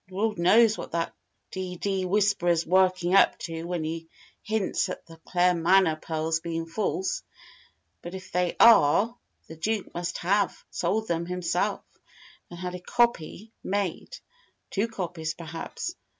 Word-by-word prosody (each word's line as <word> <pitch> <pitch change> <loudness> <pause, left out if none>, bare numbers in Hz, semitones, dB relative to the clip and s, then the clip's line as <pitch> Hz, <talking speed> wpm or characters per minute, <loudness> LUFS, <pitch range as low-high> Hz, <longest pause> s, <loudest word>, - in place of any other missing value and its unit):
Lord 210 +1 -1
knows 220 +5 +5
what - - -7
that 165 0 -1 0.4
d 185 -1 -4
d 190 +1 -1
'Whisperer's' 180 -4 +2
working 185 0 +3
up 195 - +5
to 165 -1 -6
when 175 -2 -2
he 165 +1 -5 0.3
hints 215 -3 -1
at - - -6
the 165 0 -14
Claremanagh 175 -1 +3
pearls 160 0 -1
being 165 0 -4
false. 190 +2 -2 0.8
But 175 +2 -7
if 185 - -9
they 180 -1 0
are, 225 +1 +6 0.3
the 160 - -11
Duke 210 +4 -2
must 175 0 -3
have 200 +2 0
sold 220 +2 -1
them 170 0 -1
himself, 180 -1 -1 0.7
and 175 - -9
had 180 0 -5
a 180 - -5
copy 220 0 0
made 200 - -3 0.5
two 205 +3 0
copies, 175 -7 -4
perhaps. 165 - -6
180 Hz, 140 wpm, -27 LUFS, 165-200 Hz, 0.8 s, are